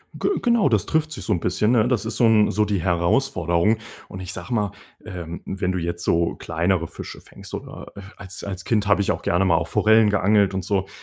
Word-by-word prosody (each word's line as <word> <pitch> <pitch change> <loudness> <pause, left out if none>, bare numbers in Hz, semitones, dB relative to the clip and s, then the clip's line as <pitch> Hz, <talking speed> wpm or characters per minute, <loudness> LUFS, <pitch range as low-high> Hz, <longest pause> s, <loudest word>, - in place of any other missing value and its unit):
Ge 400 - -1
genau 235 - +3
das 105 -6 +1
trifft 160 0 0
sich 155 - -6
so 105 - 0
'n 90 - 0
bisschen, 90 +6 +1
ne? 120 -1 +3
Das 120 -6 0
ist 110 - -4
so 120 - +4
'n 110 -2 +4
so 105 +2 +1
die 105 -2 -1
Herausforderung. 85 +1 +1 0.3
Und 95 - -8
ich 90 0 -5
sage 125 - -8
mal, 105 -4 0 0.3
ähm, 85 -2 -7
wenn 95 -1 -2
du 95 - -2
jetzt 85 0 -3
so 85 0 +1
kleinere 85 +1 -1
Fische - - -9
fängst - - -13
oder, - - -8
äh, 100 - -9 0.2
als 100 -1 -8
als 95 -2 -5
Kind 105 -3 +1
habe 105 0 +3
ich 100 - +1
auch - - -3
gerne 90 +3 +1
mal 85 -3 +3
auf 80 0 -2
Forellen 110 0 +4
geangelt 100 -1 +2
und 95 - -2
so, 95 0 -1
100 Hz, 235 wpm, -22 LUFS, 90-110 Hz, 0.3 s, so